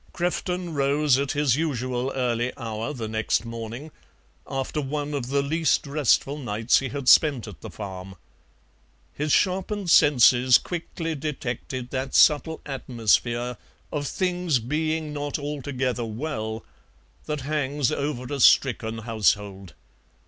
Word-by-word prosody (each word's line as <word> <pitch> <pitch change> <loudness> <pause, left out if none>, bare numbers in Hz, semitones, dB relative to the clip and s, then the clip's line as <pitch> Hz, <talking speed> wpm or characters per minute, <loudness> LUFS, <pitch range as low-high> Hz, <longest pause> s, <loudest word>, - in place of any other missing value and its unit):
Crefton 180 0 -2
rose 140 -1 +2
at 140 -1 -1
his 145 -4 +2
usual 130 -4 -2
early 125 -1 0
hour 115 +2 -4
the 120 -6 -5
next 110 +1 0
morning, 115 +6 -7 0.6
after 135 +2 -3
one 145 +1 -3
of 135 -4 -3
the 140 +1 +1
least 160 +3 +1
restful 140 0 +1
nights 115 -2 +2
he 135 - -4
had 140 0 -5
spent 140 -7 +5
at 90 -10 -11
the - - -8
farm. 95 -2 -8 1.0
His 150 +1 -2
sharpened 190 +1 +1
senses 125 -4 +6
quickly 165 -1 -5
detected 130 -4 -5
that 130 0 -3
subtle 160 +1 +4
atmosphere 120 -2 0 0.3
of 145 -2 -2
things 180 -4 0
being 155 +5 -2
not 145 -1 -3
altogether 135 -4 -3
well 110 -2 -4 0.6
that 150 -2 -2
hangs 145 -1 -1
over 140 -2 -3
a 140 - -3
stricken 115 -4 +4
household. 105 -4 -1
135 Hz, 125 wpm, -25 LUFS, 120-150 Hz, 1.0 s, senses